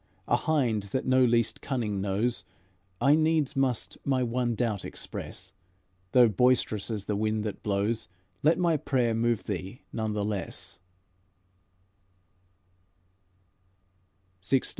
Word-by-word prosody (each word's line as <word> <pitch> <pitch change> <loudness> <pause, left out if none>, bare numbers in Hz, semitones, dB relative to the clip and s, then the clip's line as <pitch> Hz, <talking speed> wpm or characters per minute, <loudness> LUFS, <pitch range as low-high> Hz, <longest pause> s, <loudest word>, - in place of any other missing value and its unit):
A - - +4
hind 125 -9 +1 0.2
that - - -4
no 130 0 +4
least 115 -2 +2
cunning 110 -7 -2
knows, 100 +2 0 0.6
I 140 - +5
needs 155 -2 +2
must 135 -3 -1
my 130 -2 +1
one 120 0 0
doubt 110 -4 -1
express; - - -7 0.6
Though 125 -2 +7
boisterous 110 -1 +2
as 105 -3 -3
the 105 - -1
wind 110 +1 0
that 105 -2 -4
blows, 105 +2 0 0.3
Let 160 +3 +4
my 170 -3 +2
prayer 130 -5 +1
move 115 -1 +1
thee 95 +5 -5
none 110 -1 -1
the 105 -1 -1
less." 100 -3 -4
115 Hz, 120 wpm, -28 LUFS, 105-130 Hz, 0.6 s, Though